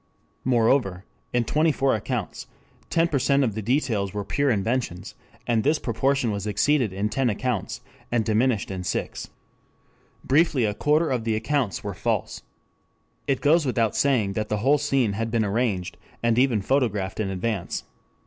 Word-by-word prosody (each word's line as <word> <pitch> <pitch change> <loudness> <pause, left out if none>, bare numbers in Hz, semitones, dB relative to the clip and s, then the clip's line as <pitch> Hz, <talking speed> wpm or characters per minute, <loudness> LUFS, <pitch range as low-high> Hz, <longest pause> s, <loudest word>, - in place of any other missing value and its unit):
Moreover 115 -6 +2 0.3
in 120 -1 +1
twenty 155 +7 +2
four 135 -1 +1
accounts 110 -1 -3 0.4
10% 140 -4 +2
of 115 -5 0
the 110 - -4
details 110 -5 0
were 100 -1 -3
pure 140 +6 0
inventions 110 -4 -1 0.3
and 115 -2 +1
this 150 +2 +3
proportion 130 0 0
was 100 0 -3
exceeded 120 +3 +2
in 100 +3 -1
ten 125 +4 0
accounts 115 0 -2 0.3
and 115 -2 +1
diminished 110 -1 +1
in 95 -1 -4
six. - - -3 0.9
Briefly 140 -3 +3
a 105 - 0
quarter 150 +6 +1
of 125 -3 -1
the 110 -1 0
accounts 115 - -1
were - - -4
false. - - -2 0.9
"It 135 -2 0
goes 160 +3 +4
without 120 -5 0
saying 120 -8 +2
that 110 +1 -3
the 105 - 0
whole 145 +2 +4
scene 135 -7 +1
had 115 +3 -2
been 115 -1 +1
arranged 100 -4 -1 0.3
and 115 0 +3
even 125 -6 +2
photographed 105 -7 0
in 105 -3 -1
advance. 95 0 -3
115 Hz, 160 wpm, -24 LUFS, 105-135 Hz, 0.9 s, goes